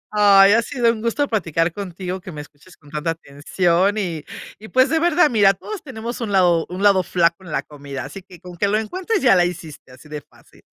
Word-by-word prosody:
Ay, 200 -1 +6
ha 230 +2 +4
sido 240 -2 0
un 220 -2 -8
gusto 235 +5 0
platicar 165 -6 -1
contigo, 185 -1 -6
que 180 -1 -10
me 150 - -8
escuches 150 +4 -15
con 145 -2 -20
tanta 150 +2 -2
atención 170 +6 -1
y 170 -6 -4 0.3
y 220 +1 -12
pues 260 +1 +3
de 325 - +2
verdad, 340 -2 +3
mira, 200 -4 +4
todos 415 - -8
tenemos 240 -3 -7
un 215 -3 -4
lado 175 -3 +3
un 180 +3 -6
lado 200 -2 +4
flaco 170 +1 0
en 160 - -10
la - - -1
comida, 140 -2 -8
así 195 - -9
que 180 -2 -16
con 180 -1 -11
que 200 - 0
lo 210 - +1
encuentres 370 - -3
ya 240 - +5
la 175 -1 +4
hiciste, 160 -6 -7
así 130 +4 -16
de 150 -1 -6
fácil. - - -24
190 Hz, 230 wpm, -20 LUFS, 165-220 Hz, 0.3 s, Ay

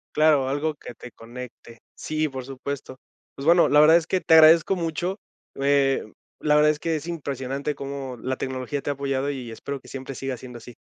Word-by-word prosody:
Claro, 150 -3 +4
algo 145 +3 -1
que 135 - -10
te 120 +1 -12
conecte. 120 0 -11
Sí, 155 0 -2
por 130 -2 -7
supuesto. 135 0 -6 0.4
Pues, 140 - -7
bueno, 170 +2 +6
la 150 +1 +5
verdad 160 +2 +7
es 165 -2 -3
que 185 - 0
te - - +2
agradezco 160 +4 +6
mucho, 175 +3 -2 0.4
eh, 135 -4 +2 0.3
la 150 -1 +2
verdad 150 0 +5
es 150 - -5
que 165 +1 -1
es 155 - -5
impresionante 140 -3 -4
cómo 135 -2 -6
la 130 0 -2
tecnología 130 +2 -4
te - - -4
ha - - +1
apoyado 140 0 -2
y 130 -5 -5
espero 140 +4 -6
que - - -16
siempre 135 0 -7
siga 135 0 -4
siendo 125 -1 -10
así. 120 +1 -12
140 Hz, 205 wpm, -24 LUFS, 130-155 Hz, 0.4 s, verdad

